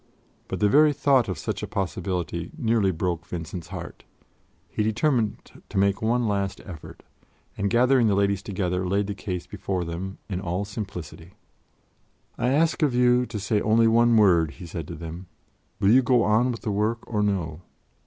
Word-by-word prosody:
But - - -4
the 105 - +4
very 150 +6 +5
thought 135 -4 +3
of 95 - -3
such - - -4
a - - -4
possibility 90 -3 -3
nearly 115 -7 +2
broke 85 -1 -2
Vincent's 85 -1 -6
heart; - - -8 0.6
he - - -3
determined 110 +1 0 0.2
to 100 - -5
make 100 0 +2
one 115 +1 +1
last 100 -2 -1
effort, 85 -5 -10 0.5
and, 100 -1 -1
gathering 125 +1 +4
the 100 - +2
Ladies 100 0 +1
together, 90 -2 -2
laid 100 +2 +1
the 100 - -3
case 95 -3 -5
before 95 -3 -3
them 90 +4 -5
in 95 -3 -3
all 90 +2 -2
simplicity. 90 -4 -8 1.0
"I 125 - 0
ask 160 +5 +2
of 145 -5 +2
you 125 0 +3
to 110 - -5
say 105 +1 0
only 115 +1 +4
one 115 +1 +4
word," 85 -7 +4
he 90 - -10
said 80 -2 -6
to - - -7
them: 85 +2 -8 0.5
"will 100 - +4
you 130 +3 +7
go 120 -1 +3
on 110 +5 +3
with 115 - -6
the 105 - -2
work 110 +3 0
or 105 -3 -1
no? 90 -6 -1
100 Hz, 180 wpm, -25 LUFS, 90-115 Hz, 1.0 s, you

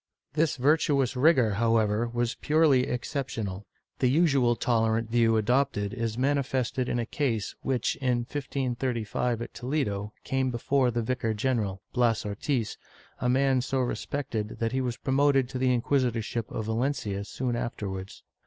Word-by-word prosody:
This 155 +1 +2
virtuous 140 -1 +2
rigor, 125 -4 +4
however, 115 +1 +2
was 120 0 -1
purely 150 -4 +3
exceptional. 115 -7 -3 0.3
The 130 - +3
usual 135 -5 +3
tolerant 115 -1 +1
view 115 -1 +4
adopted 110 -3 +1
is 115 -2 -2
manifested 130 -2 0
in - - 0
a 120 - -1
case 115 -7 -1
which, 130 -4 0
in 125 -3 +1
1535 125 -3 -2
at - - -10
Toledo, 115 -6 -2
came 135 -1 0
before 125 +2 +1
the 120 -1 -1
vicar 115 -2 -1
general, 105 -5 -1
Bias 120 -4 +2
Ortiz, 110 +3 -2 0.4
a 125 - 0
man 130 0 +3
so 130 +2 -1
respected 120 -3 -3
that 115 -1 -1
he 130 +1 0
was 125 -2 -2
promoted 135 -1 +2
to 130 - -4
the 130 0 +3
inquisitorship 120 -2 0
of 115 -6 -4
Valencia 110 -3 -1
soon 120 +3 -3
afterwards. 100 -5 -5
125 Hz, 145 wpm, -28 LUFS, 115-135 Hz, 0.4 s, rigor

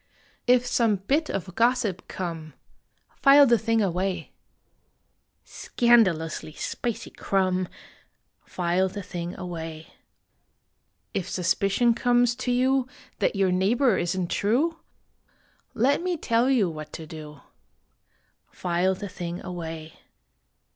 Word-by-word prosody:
If 250 0 +4
some 230 -3 +2
bit 275 - 0
of 185 -1 -4
gossip 230 -5 +1
come, 165 -5 -6 0.6
File 280 +1 +7
the 235 -3 +4
thing 225 -1 +1
away. 185 0 -2 1.1
Scandalously 185 -11 +1
spicy 235 +7 -4
crumb, 185 -2 0 0.8
File 180 +1 0
the 200 +1 -7
thing 175 -2 -6
away. 165 -3 -7 1.2
If 190 - -3
suspicion 195 +6 +2
comes 245 0 +2
to 255 -1 -2
you 260 +1 +2 0.3
That - - +1
your 195 -2 +2
neighbor 215 +6 +2
isn 175 +1 -1
t - - -3
true 285 +11 +1 1.0
Let 275 +7 +2
me 360 -1 -1
tell 235 -2 +1
you 240 -8 +3
what 155 -2 -7
to 160 - -7
do 150 -3 -10 1.1
File 180 +1 0
the 200 +2 -6
thing 175 -2 -6
away 165 -3 -7
195 Hz, 115 wpm, -26 LUFS, 175-240 Hz, 1.2 s, File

